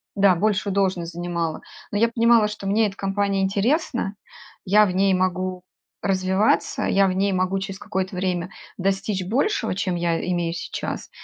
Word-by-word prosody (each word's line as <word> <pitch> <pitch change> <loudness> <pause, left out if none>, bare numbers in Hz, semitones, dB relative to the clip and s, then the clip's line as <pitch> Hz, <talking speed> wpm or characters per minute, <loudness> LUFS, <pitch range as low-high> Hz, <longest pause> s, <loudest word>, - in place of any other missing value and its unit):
да, 195 -2 +5
большую 200 +1 0
должность 185 -4 0
занимала. 170 -2 -3 0.3
Но 205 - -1
я 230 +2 +3
понимала, 230 -1 +4
что 210 -2 -6
мне 220 +3 +3
эта 195 - -7
компания 195 0 0
интересна. 210 - 0 0.5
Я 210 +3 +5
в 190 - -1
ней 195 +1 +3
могу 185 0 -1 0.4
развиваться. 190 +2 +1
Я 195 0 +3
в 185 - 0
ней 195 +1 +1
могу 185 +1 0
через 195 0 -6
какое-то 190 -2 -3
время 180 -1 -2 0.3
достичь 195 0 -1
большего, 275 - 0
чем 190 -2 -1
я 170 -1 0
имею 170 -1 -1
сейчас. - - -5
195 Hz, 160 wpm, -23 LUFS, 185-205 Hz, 0.5 s, да